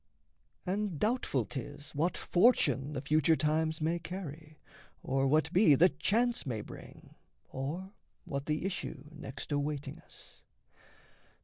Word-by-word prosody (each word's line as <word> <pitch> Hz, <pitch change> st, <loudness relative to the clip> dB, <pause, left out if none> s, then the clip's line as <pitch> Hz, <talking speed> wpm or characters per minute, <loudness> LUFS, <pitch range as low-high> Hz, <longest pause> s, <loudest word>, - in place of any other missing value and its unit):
And 195 Hz, -2 st, -1 dB
doubtful 210 Hz, -, +1 dB
'tis 145 Hz, +4 st, -7 dB
what 160 Hz, +5 st, 0 dB
fortune 175 Hz, -, +3 dB
The 135 Hz, -1 st, -4 dB
future 155 Hz, +2 st, +4 dB
times 155 Hz, +1 st, +1 dB
may 165 Hz, +2 st, +1 dB
carry, 155 Hz, -4 st, -7 dB, 0.5 s
or 135 Hz, 0 st, +1 dB
what 155 Hz, +4 st, +2 dB
be 180 Hz, -6 st, +6 dB
That 175 Hz, +7 st, +4 dB
chance 240 Hz, +3 st, +2 dB
may 115 Hz, -6 st, -3 dB
bring, -, -, -12 dB, 0.4 s
or 165 Hz, +9 st, -4 dB, 0.3 s
what 140 Hz, -1 st, -4 dB
the 155 Hz, +3 st, -1 dB
issue 165 Hz, -7 st, -4 dB
next 150 Hz, -2 st, -8 dB
Awaiting 145 Hz, 0 st, -2 dB
us. -, -, -16 dB
155 Hz, 125 wpm, -32 LUFS, 140-180 Hz, 0.5 s, be